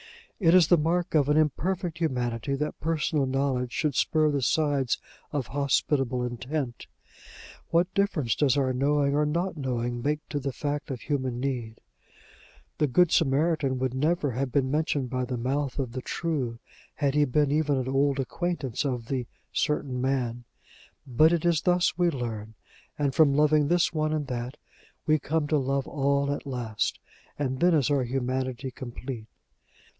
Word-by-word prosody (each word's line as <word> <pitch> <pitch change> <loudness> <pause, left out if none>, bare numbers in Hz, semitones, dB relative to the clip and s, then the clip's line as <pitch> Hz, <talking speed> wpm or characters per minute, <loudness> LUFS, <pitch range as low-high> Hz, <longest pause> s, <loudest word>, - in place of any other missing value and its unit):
It 170 -3 +5
is 180 -4 +6
the 175 - +6
mark 170 +3 0
of 145 -3 +3
an 150 - +4
imperfect 165 +3 0
humanity, 125 -4 -1
that 150 +2 -3
personal 155 -3 0
knowledge 130 -2 0
should 150 +2 0
spur 155 +3 +2
the 140 -1 0
sides 140 -2 +1 0.3
of 145 -4 -1
hospitable 135 -2 +1
intent: 125 +1 -4 0.8
what 175 +2 +2
difference 180 - +1
does 145 -2 +2
our 130 -2 +1
knowing 140 +2 +2
or 150 +1 +2
not 170 +4 -1
knowing 120 -4 -2
make 150 +4 -2
to 145 - -2
the 135 0 -3
fact 145 +2 -3
of 130 -3 -5
human 130 -4 -2
need? 125 -4 -3 1.0
The 150 - +3
good 170 +6 +4
Samaritan 145 -2 +2
would 130 -1 -1
never 150 +1 +1
have 130 +2 -2
been 130 -1 +1
mentioned 145 -4 0
by 130 -1 -1
the 125 0 -3
mouth 135 +3 -1
of 130 -4 -2
the 130 +1 -5
True, 135 -7 -2 0.4
had 140 -3 0
he 150 0 +4
been 145 +2 +1
even 150 -2 +2
an 130 -1 -2
old 135 +1 +1
acquaintance 140 -2 -2
of 125 -5 -2
the 125 -1 -3 0.3
"certain 135 -4 -1
man." 125 -3 -1 0.6
But 145 +5 +4
it 170 -1 0
is 170 -3 +3
thus 180 -1 +2
we 175 -1 +4
learn; 110 -6 -5 0.4
and, 140 -2 0
from 145 -2 +4
loving 150 0 +4
this 175 +2 +2
one 155 -1 0
and 150 -2 -1
that, 125 +1 -5 0.5
we 155 0 +3
come 155 +1 -1
to 155 - +3
love 135 0 -1
all 140 0 +1
at 145 - -6
last, 120 -5 -2 0.4
and 130 -2 -2
then 175 -1 +4
is 145 -3 +2
our 140 -2 +3
humanity 130 +1 -2
complete. 125 -2 -7
140 Hz, 170 wpm, -27 LUFS, 130-155 Hz, 1.0 s, is